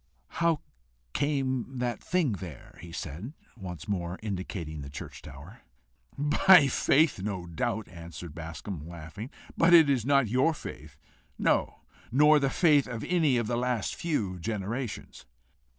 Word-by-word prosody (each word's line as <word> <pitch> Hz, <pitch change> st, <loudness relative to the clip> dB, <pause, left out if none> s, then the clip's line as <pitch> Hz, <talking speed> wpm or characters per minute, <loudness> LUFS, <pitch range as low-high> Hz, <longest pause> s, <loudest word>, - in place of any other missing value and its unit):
"How 165 Hz, -3 st, +3 dB, 0.5 s
came 135 Hz, -3 st, -1 dB
the 120 Hz, -1 st, -1 dB
thing 170 Hz, +1 st, 0 dB
there?" 90 Hz, -, -8 dB
he 85 Hz, 0 st, -10 dB
said, 85 Hz, -, -6 dB, 0.2 s
once 90 Hz, -8 st, -8 dB
more 90 Hz, -3 st, -2 dB
indicating 90 Hz, -6 st, -4 dB
the 70 Hz, -, -8 dB
church 70 Hz, -, -8 dB
tower. 75 Hz, -, -12 dB, 0.6 s
"By 150 Hz, +3 st, +6 dB
faith, 145 Hz, -, +3 dB
no 95 Hz, -3 st, -3 dB
doubt," 105 Hz, +6 st, -2 dB
answered 85 Hz, -1 st, -9 dB
Bascombe, 80 Hz, 0 st, -7 dB
laughing, 85 Hz, +8 st, -8 dB, 0.3 s
"but 170 Hz, +1 st, +4 dB, 0.3 s
not 140 Hz, -2 st, +4 dB
your 130 Hz, +8 st, +2 dB
faith; 75 Hz, -, -9 dB, 0.4 s
no, -, -, +1 dB, 0.3 s
nor 150 Hz, +4 st, +6 dB
the 135 Hz, -1 st, +1 dB
faith 150 Hz, -3 st, +4 dB
of 115 Hz, -3 st, -5 dB
any 160 Hz, -8 st, +2 dB
of 120 Hz, -, 0 dB
the 120 Hz, +2 st, -1 dB
last 125 Hz, -3 st, -1 dB
few 105 Hz, -, -2 dB
generations." 110 Hz, -, -4 dB
110 Hz, 135 wpm, -29 LUFS, 85-140 Hz, 0.6 s, By